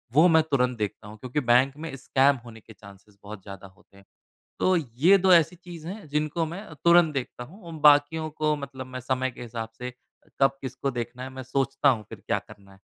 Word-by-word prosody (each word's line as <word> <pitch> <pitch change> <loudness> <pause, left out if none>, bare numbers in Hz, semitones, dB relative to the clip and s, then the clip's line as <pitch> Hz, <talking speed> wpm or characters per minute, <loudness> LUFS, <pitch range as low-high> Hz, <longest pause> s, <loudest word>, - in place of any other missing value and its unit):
वह 165 +4 +7
मैं 160 -1 +5
तुरंत 125 -3 +1
देखता 105 0 -4
हूँ। 110 +1 -11
क्योंकि 125 +6 -3
बैंक 130 +3 +5
में 160 -3 -6
स्कैम 135 +1 +2
होने 110 -1 -11
के 110 +1 -16
चाँसेज़ 100 +1 -17
बहुत 100 -1 -9
ज़्यादा 100 -1 -10
होते 100 +1 -24
हैं। 100 - -19 0.5
तो 185 - +3
ये 155 +7 +3
2 190 -1 +4
ऐसी 170 +1 +4
चीज़ 170 -2 -11
है 200 -1 -8
जिनको 150 +3 -1
मैं 175 +7 -7 0.2
तुरंत 170 -2 +5
देखता 125 -2 -4
हूँ 190 - -15
और 165 - -8 0.2
बाकियों 150 +2 +2
को 155 0 0
मतलब 135 -2 -7
मैं 130 0 -7
समय 130 +1 -1
के - - -13
हिसाब 115 -1 -6
से 125 0 -6 0.5
कब 135 0 +3
किसको 135 +1 -3
देखना 120 +1 -5
है 130 - -6
मैं 130 0 -8
सोचता 135 +2 +1
हूँ 115 -5 0
फ़िर - - -10
क्या - - +1
करना 100 -1 -17
है। 95 - -21
135 Hz, 220 wpm, -26 LUFS, 120-155 Hz, 0.5 s, वह